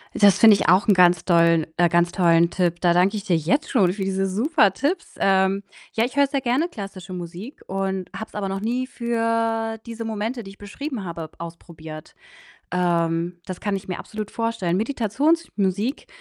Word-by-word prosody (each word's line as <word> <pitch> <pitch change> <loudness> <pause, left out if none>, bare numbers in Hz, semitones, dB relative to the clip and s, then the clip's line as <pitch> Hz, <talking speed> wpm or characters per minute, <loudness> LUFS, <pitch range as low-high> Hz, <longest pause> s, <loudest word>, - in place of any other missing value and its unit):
Das 200 -2 +5
finde 220 -2 +8
ich 195 - -1
auch 185 +5 +4
'n 200 - +5
ganz 180 -2 +5
dollen 170 -2 +3
äh, 175 0 +4
ganz 175 +1 +2
tollen 170 -2 +3
Tipp. 175 -1 -1
Da 175 -2 +4
danke 180 +4 +3
ich 205 - -5
dir 185 -5 +2
jetzt 190 - 0
schon 190 -8 +3
für 195 0 -4
diese 195 0 -1
super 215 - +2
Tipps. 315 - -2
Ähm, 190 0 +2 0.3
ja, 225 - +1
ich 250 +3 -3
höre 285 0 +5
sehr 275 0 -2
gerne 260 +6 +1
klassische 195 - -8
Musik 180 - -8
und 190 -1 -3
habe 220 - -5
es - - -25
aber 200 -2 -3
noch 195 0 -3
nie 245 +5 -2
für 230 -2 -1
diese 230 -1 -6
Momente, 225 +3 -3
die 195 - -10
ich 195 - -14
beschrieben 235 +3 -6
habe, 165 -2 -6
b - - -28
ausprobiert. 160 -2 -10 0.6
Ähm, 170 -1 0
das 185 - -7
kann 205 -1 -1
ich 190 0 -8
mir 180 - -4
absolut 215 -1 -7
vorstellen. 230 -6 -1
Meditationsmusik 235 - 0
195 Hz, 195 wpm, -23 LUFS, 175-230 Hz, 0.6 s, finde